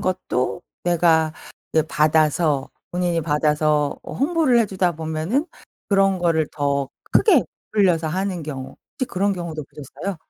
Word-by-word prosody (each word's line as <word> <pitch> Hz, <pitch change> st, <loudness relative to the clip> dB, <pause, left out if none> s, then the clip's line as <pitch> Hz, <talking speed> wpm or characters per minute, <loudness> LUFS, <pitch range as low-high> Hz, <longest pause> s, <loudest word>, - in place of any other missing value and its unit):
것도 180 Hz, -5 st, -1 dB, 0.2 s
내가 165 Hz, -2 st, +3 dB, 0.4 s
이게 160 Hz, -1 st, +3 dB
받아서 155 Hz, -2 st, +2 dB, 0.2 s
본인이 175 Hz, -1 st, 0 dB
받아서 150 Hz, -1 st, +1 dB
어 -, -, -8 dB
홍보를 290 Hz, -4 st, +2 dB
해 225 Hz, -, +2 dB
주다 185 Hz, -3 st, 0 dB
보면은 160 Hz, -, -1 dB, 0.4 s
그런 195 Hz, -2 st, +3 dB
거를 165 Hz, -3 st, +2 dB
더 140 Hz, -2 st, 0 dB, 0.2 s
크게 350 Hz, -, +5 dB, 0.3 s
부풀려서 180 Hz, -6 st, +3 dB
하는 185 Hz, +1 st, -2 dB
경우 135 Hz, -3 st, -7 dB, 0.2 s
혹시 260 Hz, -, -3 dB
그런 200 Hz, +2 st, 0 dB
경우도 170 Hz, -4 st, -5 dB
보셨어요? 150 Hz, +8 st, -7 dB
165 Hz, 295 characters per minute, -22 LUFS, 155-190 Hz, 0.4 s, 크게